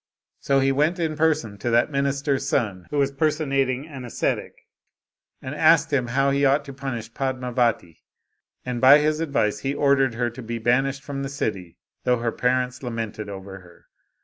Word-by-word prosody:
So 135 -1 +2
he 135 0 +3
went 150 +6 +1
in 160 -3 -1
person 150 -10 0
to 120 - -2
that 120 +5 +2
minister's 140 0 0
son, 100 -8 -1
who 150 - -3
was 140 -1 +2
personating 140 -2 0
an 135 -5 -9
ascetic, 120 - -2 0.9
and - - -5
asked - - +4
him 130 -3 +1
how 135 +3 +1
he 140 +1 +1
ought 140 +1 +3
to 140 - -8
punish 125 -4 -6
Padmavati; 125 -9 -1 0.7
and 125 -1 -3
by 135 +3 +9
his 150 +1 +1
advice 135 -10 0
he 135 +5 -2
ordered 135 -4 +2
her 120 0 -1
to 125 +2 -9
be 115 0 -4
banished 135 +4 +1
from 140 -1 -5
the 135 - -3
city, 95 -10 -4 0.3
though 125 -1 +2
her 115 0 -1
parents 125 +1 -1
lamented 115 -4 -5
over 95 0 -8
her. 90 -2 -19
130 Hz, 175 wpm, -24 LUFS, 115-140 Hz, 0.9 s, by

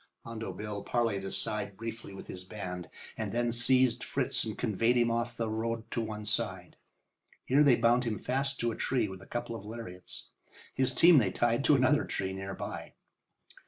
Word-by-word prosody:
Hondo 115 -1 -5
Bill 105 -1 -5
parleyed 115 -5 0
aside 100 0 -2
briefly 115 -1 -6
with 95 - -9
his 90 - -7
band, 90 -2 -6 0.3
and - - -2
then 120 0 +1
they - - 0
seized 125 0 +4
Fritz 135 -2 0
and 110 -2 -4
conveyed 115 +1 +2
him 120 -1 +3
off 120 +1 -2
the 115 - -1
road 110 +1 -2
to 115 - -1
one 105 -1 -5
side. 100 -5 -1 0.7
Here 135 +3 +4
they 140 -4 +7
bound 120 +2 +3
him 110 -3 -1
fast 135 +5 -1
to 120 0 +1
a - - -5
tree 125 -5 0
with 95 -1 -9
a - - -14
couple 120 -1 -4
of 110 - -7
lariats. 105 -4 -8 0.4
His 130 -1 +1
team 170 +2 +8
they 105 -6 +2
tied 120 +2 +1
to 150 - +6
another 135 +3 +4
tree 95 0 -3
near 95 0 -5
by. - - -6
115 Hz, 195 wpm, -31 LUFS, 105-120 Hz, 0.7 s, team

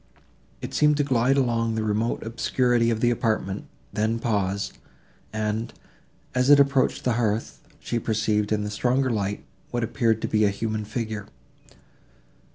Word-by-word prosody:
It - - -5
seemed 150 -1 +4
to 145 - +2
glide 130 0 +2
along 115 -3 +1
the 110 - -1
remote 110 +2 -1
obscurity 120 +1 +1
of 115 -1 -1
the 120 - +4
apartment, 110 -5 -1 0.3
then 110 +2 0
paused, 100 -4 -1 0.5
and, 110 +1 -2 0.6
as 125 +1 +2
it 145 -1 +8
approached 140 -1 +2
the 125 - +2
hearth, 110 0 -1 0.2
she 120 - -2
perceived, 110 -1 0
in 105 -1 +1
the 105 - -4
stronger 125 +4 +1
light, 105 -2 -2 0.2
what 120 -1 -2
appeared 115 -1 +1
to - - +1
be 110 0 +2
a 105 - +4
human 110 +1 -3
figure. 110 -2 -4
115 Hz, 155 wpm, -25 LUFS, 105-120 Hz, 0.6 s, it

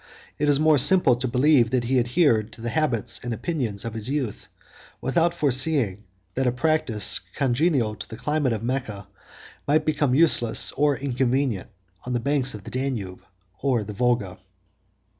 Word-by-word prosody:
It 150 - +1
is 145 -1 +3
more 155 -2 +4
simple 145 -2 +4
to 130 +1 -2
believe 125 -1 +3
that 125 0 0
he 130 +2 +1
adhered 120 -3 +2
to - - -13
the 120 0 -3
habits 125 -5 0
and 120 -1 -3
opinions 115 - -3
of 115 - -4
his 110 +1 -4
youth, 135 -7 -3 0.5
without 165 +6 +1
foreseeing 135 - +1 0.3
that 130 0 0
a - - +3
practice 125 -6 +1 0.2
congenial 135 -3 +1
to 100 -1 -9
the 110 - -8
climate 150 -1 -1
of 110 0 -4
Mecca 115 -6 -4 0.6
might 155 +2 +2
become 145 -4 +1
useless 140 -7 +2
or 145 0 +1
inconvenient 130 -5 -1 0.3
on 125 - -4
the 120 - 0
banks 135 -1 0
of 105 - -10
the - - -10
Danube 125 -8 -3 0.4
or 130 -5 +1
the 105 +1 -7
Volga. 110 -5 -1
125 Hz, 165 wpm, -24 LUFS, 115-145 Hz, 0.6 s, more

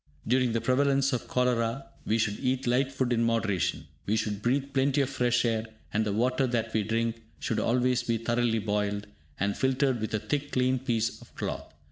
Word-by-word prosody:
During 125 0 +2
the 115 - 0
prevalence 135 +1 +2
of 125 - -2
cholera, 125 +1 0 0.2
we 110 - +2
should 105 -2 0
eat 130 +1 0
light 130 +2 +2
food 130 -2 0
in 115 0 +2
moderation. 110 -10 0 0.2
We 105 - +2
should 105 -2 -1
breathe 135 +4 0
plenty 135 +1 +2
of 135 -1 -1
fresh 125 -2 +2
air; 115 -1 0 0.3
and 110 +1 +2
the 105 - -1
water 125 +5 +1
that 115 -2 -1
we 110 - +2
drink 115 +2 -1 0.2
should 115 - -1
always 125 +1 +2
be 115 -2 0
thoroughly 120 0 +1
boiled, 105 -1 -1 0.3
and 100 +1 0
filtered 130 -2 +1
with 110 0 -1
a - - 0
thick 145 +5 -3
clean 130 0 +2
piece 115 -3 -1
of - - -17
cloth. - - -4
120 Hz, 195 wpm, -28 LUFS, 110-130 Hz, 0.3 s, During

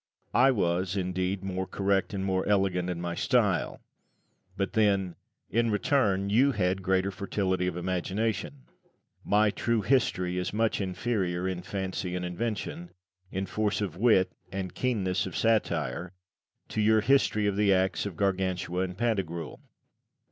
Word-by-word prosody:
I 130 +3 +6
was, 90 -4 0
indeed, 95 +1 -1
more 95 -1 -3
correct 100 -1 0
and 95 -2 -3
more 95 -1 +1
elegant 95 -3 +1
in 90 -1 -3
my 85 0 -3
style; - - +1 0.8
but 100 - -1
then, 100 -5 +2 0.4
in 115 +2 +2
return, 100 -3 +1
you 135 +6 +4
had 95 -2 0
a - - -10
greater 95 +1 +1
fertility 95 -2 -1
of 90 -1 -3
imagination. 95 - -2 0.6
My 105 +1 +3
"True 115 -1 0
History" 90 -7 +1
is 90 - -3
much 110 0 +1
inferior, 95 -2 -1
in 90 -1 -3
fancy 95 -1 -3
and 90 0 -3
invention, 115 - -4 0.4
in 95 0 -2
force 105 +1 -1
of 100 -6 -3
wit 95 -3 +3 0.2
and 95 -2 -4
keenness 100 -8 0
of 90 - -5
satire, 85 - 0 0.6
to 110 - -1
your 110 +1 +4
"History 110 -3 +3
of 100 -1 +1
the 100 -1 +3
Acts 95 +1 +1
of 90 -5 -8
Gargantua 95 -2 0
and 90 0 -8
Pantagruel." 95 -8 -2
95 Hz, 150 wpm, -28 LUFS, 90-105 Hz, 0.8 s, I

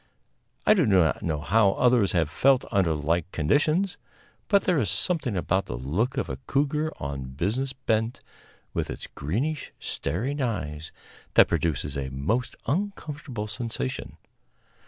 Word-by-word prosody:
I - - +7
do 175 - +3
not 90 -6 +3
know 75 -3 -1
how 100 +5 +4
others 120 -5 +3
have 85 -4 +2
felt 135 -1 +4
under 95 -6 +2
like 80 +4 0
conditions; 155 - +2 0.5
but 200 -2 +4
there 180 -5 +2
is 105 - 0
something 145 - -1
about 95 +2 0
the - - -4
look 100 - -1
of 135 - 0
a 65 - -4
cougar 150 +3 +1
on 70 -2 -5
business 110 - -1
bent, 115 -3 -1 0.5
with - - -1
its - - -6
greenish, 130 - -3
staring 125 - -2
eyes, 80 - -3 0.4
that - - +8
produces 75 -3 -1
a 65 -1 -3
most 110 - -1
uncomfortable 150 - -3
sensation. 110 - -4
110 Hz, 140 wpm, -26 LUFS, -, 0.5 s, that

